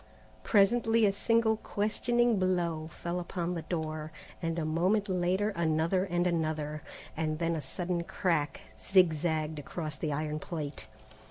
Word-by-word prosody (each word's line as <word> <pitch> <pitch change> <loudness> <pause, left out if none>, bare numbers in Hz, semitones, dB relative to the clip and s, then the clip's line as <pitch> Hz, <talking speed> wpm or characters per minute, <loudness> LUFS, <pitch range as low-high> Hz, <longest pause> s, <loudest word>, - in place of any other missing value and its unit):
Presently 225 - +4
a 200 - +4
single 225 +2 +2
questioning 230 +2 +1
blow 170 -4 0
fell 170 +2 -4
upon 175 0 -3
the 170 - -3
door, 155 -1 -3 0.3
and 165 -1 -1
a 160 - -1
moment 185 +7 +2
later 185 +2 +1
another 170 0 +1
and 175 -1 0
another, 155 -3 -1 0.3
and 155 -1 -1
then 165 0 0
a 155 - -2
sudden 175 +5 -2
crack 165 -4 -1 0.2
zigzagged 160 -4 +2
across 150 0 -5
the 155 - -2
iron 150 +1 -2
plate. 150 -8 -5
170 Hz, 140 wpm, -30 LUFS, 155-190 Hz, 0.3 s, Presently